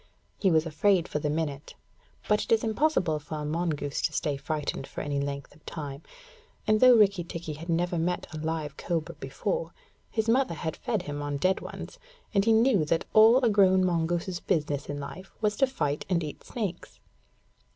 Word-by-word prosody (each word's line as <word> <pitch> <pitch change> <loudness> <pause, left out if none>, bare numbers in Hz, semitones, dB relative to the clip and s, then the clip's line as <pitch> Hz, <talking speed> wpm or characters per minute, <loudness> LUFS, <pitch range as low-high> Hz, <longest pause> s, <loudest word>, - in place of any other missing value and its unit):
He 195 - +3
was 160 -1 +3
afraid 175 +3 +2
for 150 - -2
the 150 - -1
minute; 150 -2 -3 0.5
but 210 0 +3
it - - -8
is 225 -1 +4
impossible 220 - +1
for 150 +1 -7
a 150 -1 -4
mongoose 150 -3 -2
to 155 - 0
stay 145 0 0
frightened 145 -1 -3
for - - -6
any 145 -1 -2
length 140 0 -4
of 155 - -22
time, 145 -3 -6 0.6
and 215 0 +3
though 255 0 +8
Rikki 200 -5 +4
tikki 165 -2 -6
had 165 +4 -9
never 175 +1 +1
met 175 +2 -1
a - - -5
live 155 -2 -3
cobra 165 -2 -2
before, - - -3 0.3
his 220 0 -1
mother 240 -6 +2
had 160 +1 -3
fed 215 -6 -2
him 145 0 -5
on 145 -1 -2
dead 185 +6 +2
ones, - - -8 0.3
and 200 -2 +3
he 225 - +4
knew 225 -5 +4
that 165 +2 0
all 230 +4 +7
a - - +5
grown 190 -2 +5
mongoose's 175 +1 0
business 150 -6 -1
in 145 0 -3
life 170 +7 -8
was 210 -1 +1
to 270 - +4
fight 150 - -2
and 170 -3 +1
eat 150 - -7
snakes. 200 -7 -5
170 Hz, 195 wpm, -28 LUFS, 150-205 Hz, 0.6 s, though